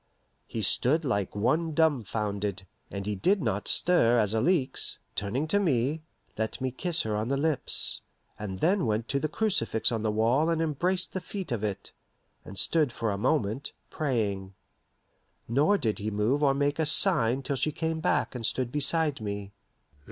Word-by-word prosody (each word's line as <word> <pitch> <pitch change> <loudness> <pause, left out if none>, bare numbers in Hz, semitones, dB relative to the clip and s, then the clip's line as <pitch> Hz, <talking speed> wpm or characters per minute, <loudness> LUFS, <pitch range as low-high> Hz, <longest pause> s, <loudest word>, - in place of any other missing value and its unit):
He 110 - -4
stood 150 - +3
like 100 -8 -1
one 155 +9 0
dumfounded, 105 - 0 0.2
and 100 -1 -5
he 105 - -1
did 185 - +2
not 110 - -2
stir 120 -10 +4
as 105 -2 +2
Alixe, 130 +3 +1 0.2
turning 115 +10 -2
to 205 - +3
me, 150 -3 0 0.4
let 110 0 -2
me 130 -1 -2
kiss 175 +6 0
her 110 -1 -2
on 105 +2 -2
the 140 +2 0
lips, 155 -1 -1 0.4
and 95 -3 -6
then 180 - +2
went 110 +1 -1
to 140 - 0
the 155 - -1
crucifix 155 - +1
on 115 -2 -1
the 110 - 0
wall 115 +9 +2
and 165 -1 +1
embraced 175 +4 -1
the 190 - -3
feet 190 -5 -6
of 115 -3 -2
it, 100 -2 -4 0.5
and 95 - -10
stood 155 0 +2
for 115 -2 -2
a - - -1
moment, 130 +1 0 0.2
praying. 100 -9 -2 0.9
Nor 145 - +3
did 110 - -2
he 105 +1 -2
move 110 +7 0
or 140 -2 +3
make 145 +2 0
a 160 - +2
sign 140 - +3
till 140 - -2
she 155 +3 +1
came 160 +1 -2
back 175 - 0
and 125 -2 -6
stood 125 +1 -1
beside 150 -1 +2
me. 100 -1 -5
130 Hz, 175 wpm, -28 LUFS, 105-160 Hz, 0.9 s, stir